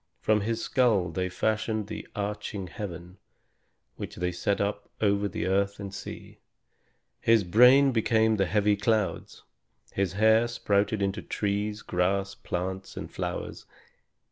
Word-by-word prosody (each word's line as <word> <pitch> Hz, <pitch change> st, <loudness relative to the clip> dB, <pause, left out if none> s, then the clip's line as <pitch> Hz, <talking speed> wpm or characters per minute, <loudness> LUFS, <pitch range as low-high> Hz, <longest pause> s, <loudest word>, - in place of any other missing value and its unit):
From 110 Hz, -1 st, +2 dB
his 115 Hz, +2 st, -2 dB
skull 110 Hz, -9 st, +2 dB
they 90 Hz, +2 st, -2 dB
fashioned 110 Hz, +2 st, -1 dB
the 110 Hz, -, -7 dB
arching 105 Hz, -1 st, -4 dB
heaven, 90 Hz, 0 st, -8 dB, 0.8 s
which -, -, -6 dB
they 90 Hz, 0 st, -1 dB
set 100 Hz, +3 st, -1 dB
up 100 Hz, 0 st, -2 dB
over 100 Hz, -1 st, +2 dB
the 95 Hz, -, -3 dB
earth 100 Hz, +2 st, 0 dB
and 100 Hz, -1 st, -6 dB
sea. 95 Hz, -, -9 dB, 0.8 s
His 115 Hz, -2 st, +4 dB
brain 125 Hz, +9 st, +6 dB
became 110 Hz, -1 st, +2 dB
the 95 Hz, -2 st, +1 dB
heavy 105 Hz, +1 st, +2 dB
clouds. 105 Hz, 0 st, -1 dB, 0.5 s
His 95 Hz, -2 st, 0 dB
hair 110 Hz, +3 st, +4 dB
sprouted 105 Hz, -2 st, 0 dB
into 100 Hz, +2 st, -1 dB
trees, 105 Hz, +1 st, -2 dB
grass, 95 Hz, +2 st, 0 dB
plants, 95 Hz, +2 st, -5 dB
and -, -, -6 dB
flowers. -, -, -5 dB
100 Hz, 135 wpm, -27 LUFS, 95-110 Hz, 0.8 s, brain